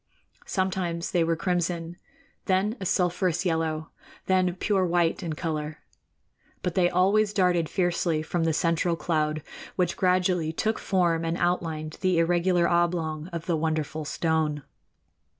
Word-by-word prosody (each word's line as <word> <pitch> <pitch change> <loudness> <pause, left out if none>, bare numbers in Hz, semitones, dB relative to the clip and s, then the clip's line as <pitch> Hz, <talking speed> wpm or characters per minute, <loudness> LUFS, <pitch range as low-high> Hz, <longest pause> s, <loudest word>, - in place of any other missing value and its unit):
Sometimes 180 -3 -1
they 175 -2 +3
were 165 0 +1
crimson; 175 -1 -1 0.5
then 195 +4 +1
a 190 - -2
sulphurous 180 -1 +1
yellow; 160 -2 -1 0.3
then 185 -1 +2
pure 195 0 +1
white 170 -2 +1
in 165 -2 -3
color. 155 -2 -3 0.9
But 180 - -1
they 175 -1 +3
always 200 +4 +3
darted 180 -5 +2
fiercely 175 -3 0
from 165 +1 -1
the 165 - +2
central 170 +1 +1
cloud, 155 -2 -1 0.3
which 180 -2 0
gradually 180 -3 +2
took 220 +6 -1
form 170 -4 +1
and 165 +1 -1
outlined 160 -3 -1
the 185 -2 +2
irregular 175 +1 +3
oblong 170 -2 0
of 170 -3 -6
the 170 - +1
wonderful 155 -1 -1
stone. 155 -1 -1
170 Hz, 135 wpm, -26 LUFS, 160-180 Hz, 0.9 s, they